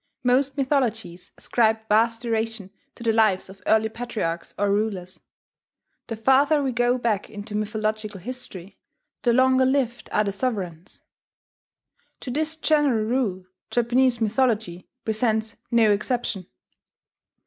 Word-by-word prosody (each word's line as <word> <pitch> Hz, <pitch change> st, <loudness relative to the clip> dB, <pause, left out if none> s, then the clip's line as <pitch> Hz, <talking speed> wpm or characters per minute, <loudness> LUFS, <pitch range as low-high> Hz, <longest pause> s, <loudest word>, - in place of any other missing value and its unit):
Most 265 Hz, +3 st, +2 dB
mythologies 235 Hz, -, -1 dB
ascribe 220 Hz, -1 st, +1 dB
vast 225 Hz, +2 st, +2 dB
duration 225 Hz, -4 st, -2 dB, 0.2 s
to 235 Hz, -, -10 dB
the 225 Hz, -1 st, +2 dB
lives 215 Hz, -5 st, +2 dB
of 190 Hz, 0 st, -13 dB
early 220 Hz, 0 st, +4 dB
patriarchs 220 Hz, -8 st, -4 dB
or 205 Hz, 0 st, +1 dB
rulers: 200 Hz, -3 st, -2 dB, 0.9 s
the 225 Hz, -, -4 dB
farther 280 Hz, +6 st, +3 dB
we 265 Hz, -, 0 dB
go 245 Hz, +1 st, +2 dB
back 225 Hz, -5 st, -1 dB
into 210 Hz, 0 st, -7 dB
mythological 215 Hz, -1 st, -2 dB
history, 200 Hz, -4 st, -8 dB, 0.4 s
the 240 Hz, -, +3 dB
longer 260 Hz, +1 st, +4 dB
lived 260 Hz, -3 st, 0 dB
are 210 Hz, -, +2 dB
the 200 Hz, -, -1 dB
sovereigns. 195 Hz, -6 st, -4 dB, 1.2 s
To 255 Hz, -, -5 dB
this 310 Hz, +4 st, -1 dB
general 295 Hz, -8 st, +2 dB
rule 215 Hz, -6 st, -1 dB, 0.2 s
Japanese 240 Hz, +1 st, +2 dB
mythology 220 Hz, -6 st, 0 dB, 0.2 s
presents 220 Hz, 0 st, 0 dB
no 230 Hz, -3 st, +4 dB
exception. 205 Hz, -3 st, -1 dB
225 Hz, 125 wpm, -24 LUFS, 210-250 Hz, 1.2 s, early